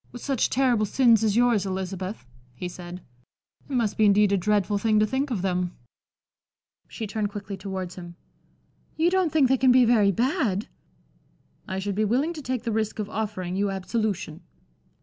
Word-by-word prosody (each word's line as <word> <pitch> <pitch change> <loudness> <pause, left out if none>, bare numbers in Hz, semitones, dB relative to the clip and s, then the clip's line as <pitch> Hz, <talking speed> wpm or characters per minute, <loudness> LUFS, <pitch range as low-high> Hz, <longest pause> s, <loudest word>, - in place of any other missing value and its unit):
"With 245 - -10
such 270 -4 0
terrible 245 -5 +2
sins 230 -2 +4
as 210 -2 +2
yours, 240 -4 +3
Elizabeth," 190 +1 -4 0.3
he 180 - -5
said, 180 0 -9 0.7
"it - - -6
must 225 -4 0
be 215 - +4
indeed 205 0 +4
a - - +4
dreadful 205 +1 +1
thing 215 0 +2
to 215 - +4
think 265 +5 -1
of 210 -8 -2
them." 180 -1 -1 1.1
She 225 - -6
turned 210 0 -2
quickly 200 -1 -6
towards 190 -2 -5
him. 175 -1 -10 0.8
"You 335 +2 +3
don't 370 -4 +2
think 290 -3 +4
that 260 - +2
they - - +3
can 260 -1 +5
be 250 0 +6
very 215 -4 +4
bad?" 235 - 0 1.0
"I 190 - -4
should 200 +1 -2
be 215 +3 0
willing 260 +10 +1
to 310 - -7
take 255 -3 -3
the 235 - -2
risk 220 -1 -1
of 210 -1 -4
offering 200 -5 -3
you 200 +1 0
absolution." 195 -4 -3
210 Hz, 185 wpm, -25 LUFS, 190-245 Hz, 1.1 s, be